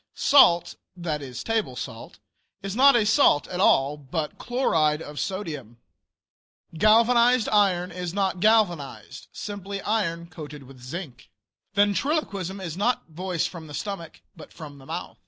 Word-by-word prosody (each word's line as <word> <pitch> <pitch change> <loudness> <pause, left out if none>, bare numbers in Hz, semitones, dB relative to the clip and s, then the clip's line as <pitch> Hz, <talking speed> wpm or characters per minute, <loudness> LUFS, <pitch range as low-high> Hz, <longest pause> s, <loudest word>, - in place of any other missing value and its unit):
Salt 175 -11 +4 0.2
(that 160 -4 -3
is 130 -3 -7
table 220 - -1
salt) 115 -3 -8 0.5
is 195 0 -4
not 275 +2 +6
a 225 -3 +3
salt 215 - +4
at 180 - -5
all, 145 -6 +3
but 150 +2 -5
"chloride 160 - +1
of 150 -2 -8
sodium." 150 - -5 1.0
Galvanized 235 +5 +4
iron 190 -4 +2
is 180 0 -5
not 190 -1 -1
galvanized 175 -10 0
simply 200 -1 -6
iron 170 -6 -1
coated 150 -4 -10
with 130 -1 -15
zinc. 130 -2 -8 0.5
Ventriloquism 205 - 0
is 170 -4 -6
not 225 +6 0
voice 175 +1 -2
from 165 -3 -7
the 145 - -8
stomach, 170 -1 -6
but - - -13
from 145 -4 -11
the 135 - -15
mouth. - - -6
180 Hz, 140 wpm, -25 LUFS, 150-210 Hz, 1.0 s, not